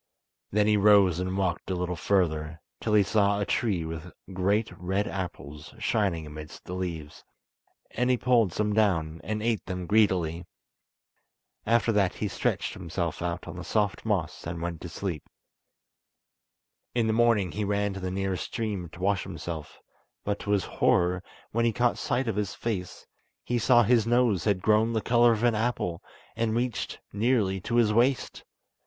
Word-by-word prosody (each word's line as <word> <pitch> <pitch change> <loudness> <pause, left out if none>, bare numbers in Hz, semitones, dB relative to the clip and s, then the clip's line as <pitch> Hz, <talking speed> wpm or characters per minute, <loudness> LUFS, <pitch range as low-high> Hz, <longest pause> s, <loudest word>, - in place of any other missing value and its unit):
Then 105 +1 +3
he 105 0 +4
rose 100 -4 +5
and 95 +1 -2
walked 95 -3 -1
a 95 - 0
little 90 0 -2
further, 80 -3 0 0.2
till 110 -1 0
he 105 - +6
saw 100 0 +2
a 100 - 0
tree 100 -9 0
with 80 +1 -6 0.2
great 100 +4 +1
red 95 +3 -1
apples 75 - -6
shining 100 -7 0
amidst 75 0 -10
the 90 - -6
leaves, 85 -5 -5 0.7
and 125 +2 0
he 125 - +3
pulled 120 -6 +3
some 105 +4 0
down, 85 -7 +1
and 110 0 -3
ate 115 -2 0
them 90 -1 -4
greedily. 90 -5 +2 1.2
After 115 +1 +3
that 100 -4 +2
he 105 - -2
stretched - - -1
himself 85 0 -4
out 85 0 -3
on - - -7
the 90 - -6
soft 105 0 0
moss 95 -9 -2
and 85 0 -4
went 85 -1 -4
to 85 - -6
sleep. 85 -3 -5 1.7
In 120 -2 +2
the 110 - +1
morning 115 -5 +3
he 105 - -3
ran 100 0 0
to 95 - -6
the 95 -1 -3
nearest 95 -3 -2
stream 105 -7 -3
to 90 - -11
wash 100 0 +2
himself, 80 -3 -7 0.5
but 100 0 -2
to - - -7
his 100 -2 +2
horror, 90 +1 +2 0.3
when 115 +1 +1
he 115 - +3
caught 120 +1 +1
sight 125 +1 -1
of 110 -3 -1
his 105 -1 -2
face, 95 -6 -4 0.4
he 120 0 -1
saw 120 +2 +5
his 115 0 +3
nose 120 -8 +2
had 100 -3 +1
grown 110 +1 +3
the 110 - 0
colour 120 +1 +4
of 110 0 -1
an 120 -1 +4
apple, 110 -6 -1 0.3
and 115 -1 0
reached 120 0 -2
nearly 105 -3 +1
to 120 - -3
his 115 -3 +4
waist. 125 +4 +1
100 Hz, 175 wpm, -27 LUFS, 90-110 Hz, 1.7 s, he